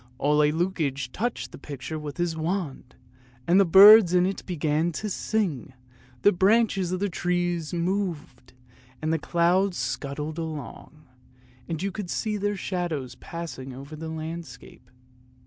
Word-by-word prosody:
Ole 150 +1 +3
Lukoie 150 -6 -2
touched 240 +3 -3
the - - -11
picture 145 +2 -6
with 145 -2 -7
his 175 -1 -1
wand, 160 -6 -4 0.5
and 180 +3 +4
the 200 - +5
birds 195 +1 +9
in 180 0 +4
it 195 +1 -3
began 160 -1 0
to 210 +6 -4
sing, 175 - -2 0.5
the 205 - +7
branches 195 -1 +2
of 185 - -1
the 205 - 0
trees 175 -3 -1
moved, 170 -8 -3 0.5
and 155 +1 -1
the 165 - 0
clouds 175 +4 +1
scudded 140 +5 -4
along; 155 -1 -7 0.6
you 175 +4 -3
could 200 -2 -6
see 215 +2 -2
their 205 0 -1
shadows 170 -10 -3
passing 135 -3 -7
over 140 +4 -9
the 160 +1 -6
landscape. 160 -3 -8
170 Hz, 140 wpm, -26 LUFS, 150-190 Hz, 0.6 s, birds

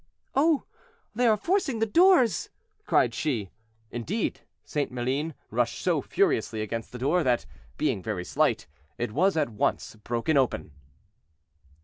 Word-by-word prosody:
"Oh! 300 +1 +3 0.5
they 245 +2 +2
are 215 -2 +4
forcing 335 - 0
the 225 - +2
doors," 330 - +4 0.4
cried 120 - +3
she. 115 - -2 0.4
Indeed, 160 - -2 0.2
St. 145 -3 -2
Maline 130 +5 -2 0.2
rushed - - 0
so - - +1
furiously 110 -1 0
against 115 +1 -5
the 125 - -7
door, 145 +8 +2
that, 125 - +1 0.3
being 95 - 0
very 95 -3 -3
slight, - - +1 0.3
it 120 -2 -2
was 180 - +2
at 150 -5 +1
once 110 0 -1
broken 120 +7 0
open. 130 - 0
140 Hz, 135 wpm, -27 LUFS, -, 0.5 s, are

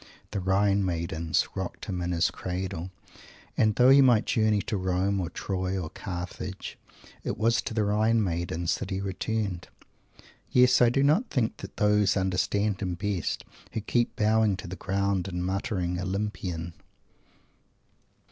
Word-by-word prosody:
The 100 - -2
Rhine 100 +1 +2
Maidens 85 -2 0
rocked 95 -2 -5
him 90 -3 -3
in 90 0 -2
his 85 -1 +2
cradle 90 -1 -4 0.7
and, 110 -2 +3
though 125 +1 +6
he 140 +1 +8
might 120 -5 +5
journey 110 -2 +2
to - - -2
Rome 95 +1 0
or 85 - -3
Troy 95 +1 -2
or 80 -3 -5
Carthage, 90 -2 -6 0.4
it - - -3
was 115 +2 +2
to 110 - -5
the 110 - +2
Rhine 110 +2 +2
Maidens 85 -1 -1
that 95 - -5
he 95 - -2
returned. 100 -1 -3 0.8
Yes, 125 0 +5
I 120 - +7
do 135 +3 +2
not 160 - +3
think 120 -5 0
that - - -10
those 105 -1 +3
understand 95 +2 0
him 90 -3 -2
best 100 -1 -2 0.3
who 110 - -2
keep 120 +3 0
bowing 110 -2 +3
to 95 - -8
the 90 - -6
ground 100 +1 -1
and 90 -1 -3
muttering 90 -2 -1
"Olympian"! 90 -3 -3
95 Hz, 155 wpm, -27 LUFS, 90-110 Hz, 0.8 s, he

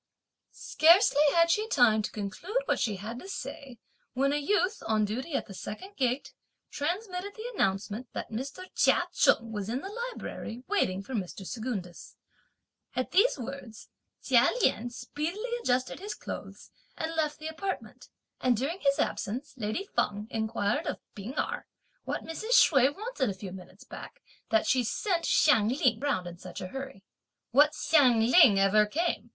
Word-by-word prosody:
Scarcely 325 -2 +4
had 335 0 +5
she 430 +5 +1
time 240 - +4
to 210 - -3
conclude 215 - -4
what - - 0
she 215 -4 0
had 220 +5 -6
to 380 - -10
say 270 -9 -7 0.4
when 275 +2 +1
a - - +1
youth, 365 +6 +1
on 215 -1 +2
duty 255 +9 -4
at - - -1
the 200 - -10
second 375 - -8
gate, 255 +1 -1 0.4
transmitted 365 +5 -3
the 445 +2 -6
announcement 205 - -1
that - - -5
Mr. 270 +10 -5
Chia - - +4
Cheng 230 0 +3
was 205 -1 -4
in 250 +4 -2
the 385 - -6
Library 470 - -6
waiting 195 - 0
for 260 - -8
Mr. 195 -3 -4
Secundus. 215 -6 -5 0.8
At 255 - -2
these 405 +2 +4
words, 245 -3 -8 0.3
Chia - - +5
Lien 240 +2 +2
speedily 315 - -4
adjusted 255 - 0
his 410 +3 -5
clothes, - - -8 0.3
and 320 +1 -3
left 305 -2 0
the 310 - -7
apartment; 380 +5 -5 0.3
and 250 -3 +2
during 295 - -2
his 275 -4 +2
absence, 250 +8 -2
lady 235 - -3
Feng 210 0 0
inquired 220 -2 -1
of - - -2 0.2
P'ing 215 +8 -8
Erh - - -2 0.4
what - - -3
Mrs. 435 +9 -3
Hsüeh 275 -1 +5
wanted 405 - -2
a 195 - -3
few 190 0 -8
minutes 185 +1 -12
back, - - -11 0.3
that 220 - +3
she 255 -1 +2
sent 340 - -1
Hsiang 225 -9 +4
Ling 250 -3 +2
round 265 -11 -1
in 175 0 -8
such - - -8
a 185 -1 -6
hurry. 270 -6 -7 0.5
"What 290 +5 +5
Hsiang 255 -8 +4
Ling 250 - +8
ever 205 +2 +4
came?" 335 +10 -1
260 Hz, 165 wpm, -29 LUFS, 215-335 Hz, 0.8 s, Ling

